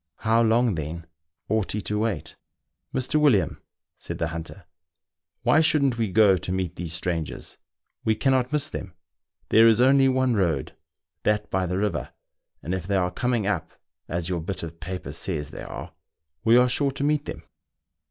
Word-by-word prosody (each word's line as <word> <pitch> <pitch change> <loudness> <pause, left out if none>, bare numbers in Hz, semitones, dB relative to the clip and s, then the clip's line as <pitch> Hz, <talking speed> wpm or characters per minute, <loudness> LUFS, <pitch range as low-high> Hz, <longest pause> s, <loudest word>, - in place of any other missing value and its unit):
How 115 +1 +2
long, 115 0 +3
then, 80 +1 -5 0.4
ought 110 -1 0
he 105 - -2
to 105 +1 -2
wait? 105 -8 -2 0.3
" - - -56
Mr. 130 +4 0
William," 110 - +3 0.4
said - - -6
the - - -1
hunter, 85 +3 -7 0.4
" - - -58
why 155 - +5
shouldn't 140 -6 +2
we 110 -4 0
go 100 -1 +5
to 90 - -4
meet 90 -2 -2
these 85 -2 -4
strangers. 85 -2 -3 0.2
' - - -56
We 110 - +2
cannot 130 +2 +1
miss 150 0 +1
them; 95 -3 -6 0.5
there 115 +1 +7
is 115 0 +5
only 135 +1 +5
one 130 -1 +2
road, 85 -9 0 0.5
that 105 0 0
by 95 -1 0
the 90 +1 -2
river, 105 +1 -1 0.5
and 85 - -3
if 95 -1 -3
they 100 - 0
are 90 -1 +1
coming 120 +2 0
up, 100 -6 -2 0.3
as 85 0 -3
your 90 -3 -2
bit 90 +1 -4
of 85 0 -7
paper 90 -4 -5
says 75 -2 -3
they - - -8
are, - - -8 0.5
we 115 +2 +6
are 125 0 +5
sure 140 +3 +2
to 135 +1 -4
meet 150 0 +1
them." - - -7
105 Hz, 185 wpm, -25 LUFS, 90-125 Hz, 0.5 s, there